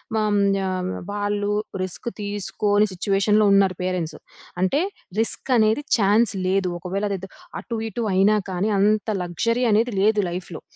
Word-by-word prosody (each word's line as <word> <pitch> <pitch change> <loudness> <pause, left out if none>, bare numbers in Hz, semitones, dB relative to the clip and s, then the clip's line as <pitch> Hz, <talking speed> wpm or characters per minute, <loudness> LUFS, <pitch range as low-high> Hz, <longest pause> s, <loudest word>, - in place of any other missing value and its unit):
హ్మ్, 210 -2 +2 0.3
ఆహ్, 185 -1 -2 0.2
వాళ్ళు 205 0 -1 0.3
రిస్క్ 185 +5 -6
తీసుకొని 205 +1 0
సిట్యుయేషన్‌లో 200 +3 +2
ఉన్నారు 195 -2 +3
పేరెంట్సు. 180 -3 -3 0.4
అంటే 190 +10 +2 0.4
రిస్క్ 230 +4 0
అనేది 220 +5 +3 0.2
ఛాన్స్ 215 +1 +3
లేదు. 190 0 +1
ఒకవేళ 190 +4 -3
అదేదో 195 -1 -5 0.3
అటు 230 -2 -5
ఇటు 235 +1 -4
అయినా 200 +3 +4
కానీ 185 +3 -1
అంత 215 +2 +2
లగ్జరీ 230 +8 0
అనేది 225 +2 +2
లేదు 210 +1 +3
లైఫ్‌లో. 175 -1 -6
205 Hz, 135 wpm, -23 LUFS, 185-215 Hz, 0.4 s, అయినా